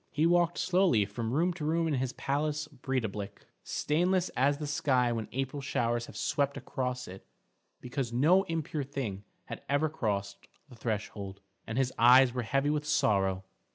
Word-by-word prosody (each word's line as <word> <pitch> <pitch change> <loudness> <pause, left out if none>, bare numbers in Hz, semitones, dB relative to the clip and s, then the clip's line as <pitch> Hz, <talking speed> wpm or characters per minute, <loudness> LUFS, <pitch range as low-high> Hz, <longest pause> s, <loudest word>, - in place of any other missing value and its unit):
He 155 - +1
walked 175 0 +3
slowly 175 - +3
from 110 +3 -4
room 170 +7 +2
to 170 -3 -7
room 165 +2 +1
in 155 - 0
his 130 -1 -1
palace 150 +2 -1
Breidablik, 110 -8 -4 0.2
stainless 180 +4 +1
as 140 +2 +1
the 150 - -4
sky 130 -4 +1
when 115 -2 -3
April 135 +2 -3
showers 120 -3 -1
have - - -10
swept 140 -1 0
across 125 -1 -3
it 95 +1 -10 0.6
because 125 -1 -3
no 155 +11 +4
impure 160 -2 -2
thing 125 -8 -5 0.2
had - - -7
ever 145 +3 +2
crossed 100 -8 -3 0.2
the 130 - -14
threshold, 105 -3 -4 0.3
and 110 - -4
his 130 -1 +1
eyes 125 +1 +7
were 125 - -1
heavy 135 +5 +1
with 150 -1 -1
sorrow. 95 -7 +2
130 Hz, 165 wpm, -30 LUFS, 115-150 Hz, 0.6 s, eyes